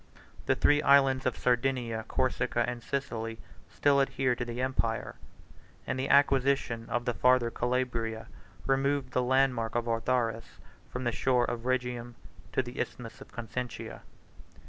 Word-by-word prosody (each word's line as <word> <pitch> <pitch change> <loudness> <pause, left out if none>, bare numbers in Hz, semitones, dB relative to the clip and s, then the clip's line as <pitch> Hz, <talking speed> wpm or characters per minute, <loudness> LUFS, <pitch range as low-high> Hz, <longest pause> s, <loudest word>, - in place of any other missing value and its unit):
The - - +3
three 145 0 +4
islands 135 -2 +4
of 125 - -1
Sardinia, 120 -3 0
Corsica, 125 -2 0
and 120 -1 -4
Sicily, 115 -4 -3 0.3
still 140 -1 +3
adhered 130 -2 0
to 120 - -1
the 120 0 -5
empire; 130 -3 -1 0.7
and 130 - -2
the 135 - -2
acquisition 135 -4 +3
of 120 0 -1
the 120 - 0
farther 125 -1 +3
Calabria 120 -3 -1 0.4
removed 135 -1 +1
the 125 - +1
landmark 125 -3 +1
of 120 0 0
Autharis 115 -1 -1 0.3
from 125 - -5
the 120 - +1
shore 125 +1 +2
of 120 0 -4
Rhegium 125 -2 -2 0.4
to 130 - +1
the 120 0 -8
Isthmus 115 -2 -5
of - - -12
Consentia. 120 +1 -6
125 Hz, 145 wpm, -30 LUFS, 120-130 Hz, 0.7 s, three